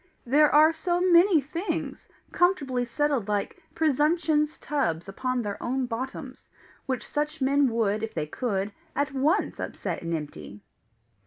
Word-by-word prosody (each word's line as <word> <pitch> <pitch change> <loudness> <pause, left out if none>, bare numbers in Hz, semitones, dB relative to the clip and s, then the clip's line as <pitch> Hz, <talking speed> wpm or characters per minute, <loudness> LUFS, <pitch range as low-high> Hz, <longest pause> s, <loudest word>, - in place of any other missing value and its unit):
There 295 +5 +5
are 310 +2 +6
so 345 +2 -1
many 355 -1 +5
things, 330 +8 -4 0.2
comfortably 280 -9 +1
settled 270 -2 0
like 205 -1 -2
Presumption's 305 0 +1
tubs 180 - -2
upon 255 +5 -2
their 205 -1 -5
own 260 +1 -1
bottoms, 255 +2 -6 0.4
which 260 -1 -3
such 300 0 -2
men 280 +1 +3
would, 215 -2 0
if 225 0 -5
they 155 -2 -1
could, 200 - -2 0.2
at 285 0 -1
once 280 +4 +1
upset - - -4
and 170 0 -2
empty!" 145 -9 -8
270 Hz, 140 wpm, -26 LUFS, 225-300 Hz, 0.4 s, are